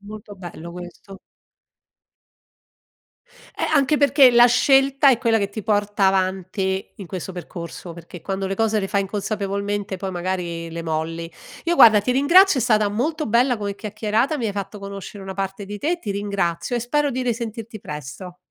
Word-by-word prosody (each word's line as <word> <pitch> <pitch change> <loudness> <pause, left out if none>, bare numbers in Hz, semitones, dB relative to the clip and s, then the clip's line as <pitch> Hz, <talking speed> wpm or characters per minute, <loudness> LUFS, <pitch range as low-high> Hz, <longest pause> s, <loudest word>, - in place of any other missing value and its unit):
Molto 205 0 -10
bello 170 -2 -9
questo. 180 +2 -10 2.4
Eh, - - -4
anche 295 0 +3
perché 280 -3 +5
la 240 0 +7
scelta 270 +2 +4
è 250 - +4
quella 230 -3 +2
che 200 -2 -1
ti 210 +1 -7
porta 205 -1 +1
avanti 190 0 -1
in 195 - -9
questo 185 +1 -6
percorso, 175 -1 -8
perché 170 0 -11
quando 195 -1 -3
le 195 - -3
cose 220 -1 +1
le 195 - -3
fai 200 0 +1
inconsapevolmente 200 0 -3
poi 190 +1 -4
magari 175 -2 -4
le 165 0 -5
molli. 165 +1 -3 0.3
Io, 345 0 +1
guarda, 220 -6 +8
ti 230 +5 -2
ringrazio 320 +5 +5
è - - +1
stata 215 -4 +3
molto 300 +10 -2
bella 240 +3 +3
come 200 -1 -4
chiacchierata. 215 +7 -1
Mi 230 - -1
hai 205 - -2
fatto 200 +1 -6
conoscere 200 0 -8
una 190 0 -7
parte 195 +1 -4
di 205 +1 -6
te. 345 +8 -1
Ti 210 - -5
ringrazio 200 +1 -2
e 240 - 0
spero 290 +4 0
di 255 +1 -2
risentirti 230 -2 -4
presto. 150 +5 -8
205 Hz, 170 wpm, -22 LUFS, 190-240 Hz, 2.4 s, guarda